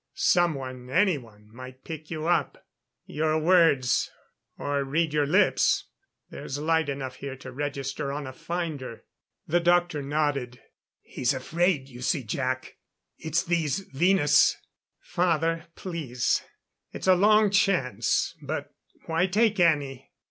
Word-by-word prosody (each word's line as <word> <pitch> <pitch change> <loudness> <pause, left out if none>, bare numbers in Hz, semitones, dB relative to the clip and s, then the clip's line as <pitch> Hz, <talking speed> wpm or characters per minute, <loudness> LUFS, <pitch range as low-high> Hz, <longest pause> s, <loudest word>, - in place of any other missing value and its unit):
Someone 135 -8 0
anyone 130 - 0
might 130 +1 -11
pick 160 -1 -8
you 155 -1 -4
up. 175 0 0 0.4
Your 155 +1 0
words 160 -7 +3 0.5
or 140 -1 -1
read 150 +3 0
your 150 -1 +2
lips 185 +7 +2 0.4
there's 135 - -6
light 160 0 +1
enough 135 -2 -5
here 140 -1 -6
to 130 0 -10
register 140 0 -4
on 145 +1 -4
a 130 - -7
finder." 155 -7 -5 0.4
The 175 +3 +2
doctor 175 -3 +2
nodded. 140 -4 -1 0.4
"He's 130 +2 -1
afraid 160 +2 0
you 125 -2 -12
see, 135 +2 0
Jac, 130 +3 -3 0.4
it's 160 +3 0
these 170 0 0
Venus 150 -1 +4 0.2
" - - -61 0.2
"Father 165 -1 +1
please. 150 -10 -1 0.5
It's - - -7
a 190 - +6
long 210 +2 +4
chance 125 - +1
but - - -5 0.3
why 165 +3 +1
take 210 +1 +2
any? 145 -6 +1
150 Hz, 125 wpm, -26 LUFS, 130-175 Hz, 0.5 s, a